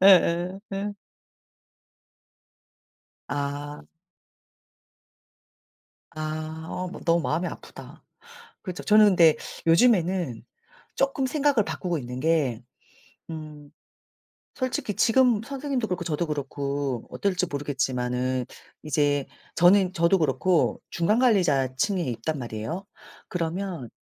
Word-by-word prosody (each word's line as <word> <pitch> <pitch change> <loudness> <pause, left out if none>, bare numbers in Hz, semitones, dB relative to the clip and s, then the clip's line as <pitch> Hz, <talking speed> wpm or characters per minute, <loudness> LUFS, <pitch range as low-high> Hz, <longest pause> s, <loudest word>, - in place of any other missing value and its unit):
예예 185 -1 +5
예. 205 +1 -2 2.4
아. 145 +1 -4 2.3
아 155 +1 -5
어 185 0 -3
머 - - -8
너무 170 0 +3
마음이 165 +3 -1
아프다. - - -10 0.6
그렇죠. 185 -3 -6
저는 215 0 +6
근데 170 -6 +6 0.3
요즘에는 175 - +3 0.5
쪼끔 270 0 +1
생각을 275 -3 +2
바꾸고 175 -3 -2
있는 125 -2 -6
게 145 -7 +1 0.7
음 155 -2 -8 0.9
솔직히 255 -5 -2
지금 235 -1 +4
선생님도 275 -2 -3
그렇고 180 -3 -3
저도 165 +1 -1
그렇고 140 -3 -3
어떨지 190 -2 -1
모르겠지만은 130 -3 -1 0.4
이제 145 -2 +1 0.3
저는 185 +1 +5
저도 170 +2 +3
그렇고 165 +3 +2
중간 190 +7 +1
관리자 170 - +3
층에 195 +4 +1
있단 135 +3 -3
말이에요. 120 - -5 0.4
그러면 170 -4 -3
165 Hz, 220 characters per minute, -26 LUFS, 145-195 Hz, 2.4 s, 저는